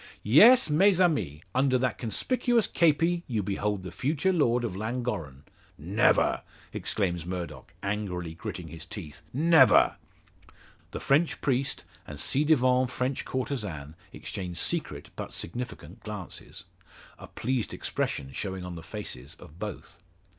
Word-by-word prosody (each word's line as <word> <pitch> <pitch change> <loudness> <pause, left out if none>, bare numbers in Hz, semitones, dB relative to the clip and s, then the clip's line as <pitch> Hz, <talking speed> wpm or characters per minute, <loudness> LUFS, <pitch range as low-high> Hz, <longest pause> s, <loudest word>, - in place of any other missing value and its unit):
Yes, 225 - +7
mes 185 +5 +4
amis! 105 - +1
Under 130 0 +3
that 125 0 -1
conspicuous 240 - +1
kepi 170 +1 +2
you 110 -5 -1
behold 100 0 -2
the 90 - -6
future 150 - 0
lord 125 -7 +2
of 110 -6 -3
Llangorren." 105 - -3 0.3
"Never!" - - +2 0.3
exclaims 90 -5 -1
Murdock, 90 0 -6
angrily 95 -5 -3
gritting 85 0 -6
his 80 0 -8
teeth. 80 -7 -9
"Never!" 150 -4 +5 0.9
The - - -6
French 155 +5 +2
priest 135 0 0 0.2
and 75 - -8
ci 140 - +3
devant 130 -4 +3
French 130 +1 -2
courtesan 100 - -4 0.2
exchange 90 -4 -6
secret, - - -1
but - - -6
significant, 125 +9 -6
glances; 105 -4 -7 0.6
a - - -10
pleased 125 -1 -2
expression 65 - -3
showing 95 +3 -4
on 90 - -6
the 85 - -7
faces 75 - -8
of 75 +4 -15
both. 105 -1 -7
110 Hz, 130 wpm, -28 LUFS, 90-140 Hz, 0.9 s, Yes